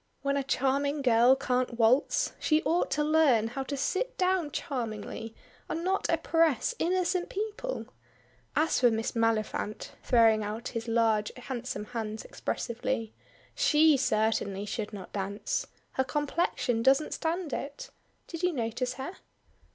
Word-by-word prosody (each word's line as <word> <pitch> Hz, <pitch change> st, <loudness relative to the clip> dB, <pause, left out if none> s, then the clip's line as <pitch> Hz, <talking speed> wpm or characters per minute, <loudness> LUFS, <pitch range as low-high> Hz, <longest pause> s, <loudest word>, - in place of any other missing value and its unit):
When 280 Hz, 0 st, +1 dB
a 280 Hz, -, +1 dB
charming 275 Hz, +2 st, 0 dB
girl 240 Hz, +1 st, +6 dB
can't 255 Hz, -2 st, -1 dB
waltz, 240 Hz, +5 st, +3 dB
she 310 Hz, 0 st, +2 dB
ought 345 Hz, +2 st, +1 dB
to 300 Hz, -, +1 dB
learn 295 Hz, -8 st, +4 dB
how 270 Hz, +3 st, -4 dB
to 280 Hz, +1 st, -4 dB
sit 380 Hz, -, -1 dB
down 365 Hz, -4 st, +1 dB
charmingly, 225 Hz, -4 st, -4 dB, 0.3 s
and 330 Hz, -, -2 dB
not 380 Hz, +2 st, 0 dB
oppress 325 Hz, -, +2 dB
innocent 365 Hz, +1 st, +1 dB
people. 435 Hz, +5 st, -4 dB, 0.7 s
As 315 Hz, +2 st, +2 dB
for 245 Hz, -, +6 dB
Miss 225 Hz, 0 st, -1 dB
Maliphant!" 225 Hz, -2 st, -1 dB
throwing 225 Hz, -3 st, +4 dB
out 215 Hz, +3 st, -4 dB
his 230 Hz, 0 st, -5 dB
large 225 Hz, -2 st, +2 dB
handsome 245 Hz, -4 st, -5 dB
hands 220 Hz, -1 st, -5 dB
expressively, 235 Hz, -1 st, -3 dB, 0.4 s
"she 305 Hz, 0 st, +5 dB
certainly 215 Hz, -5 st, 0 dB
should 210 Hz, +1 st, -4 dB
not 200 Hz, -3 st, -9 dB
dance. 200 Hz, -, -2 dB, 0.2 s
Her 265 Hz, -, +1 dB
complexion 280 Hz, -5 st, 0 dB
doesn't 270 Hz, +5 st, +3 dB
stand 330 Hz, -2 st, -2 dB
it. 400 Hz, -, -5 dB, 0.3 s
Did 330 Hz, -1 st, -7 dB
you 360 Hz, -1 st, +2 dB
notice 245 Hz, 0 st, -2 dB
her?" 275 Hz, +9 st, -6 dB
260 Hz, 135 wpm, -29 LUFS, 225-310 Hz, 0.7 s, girl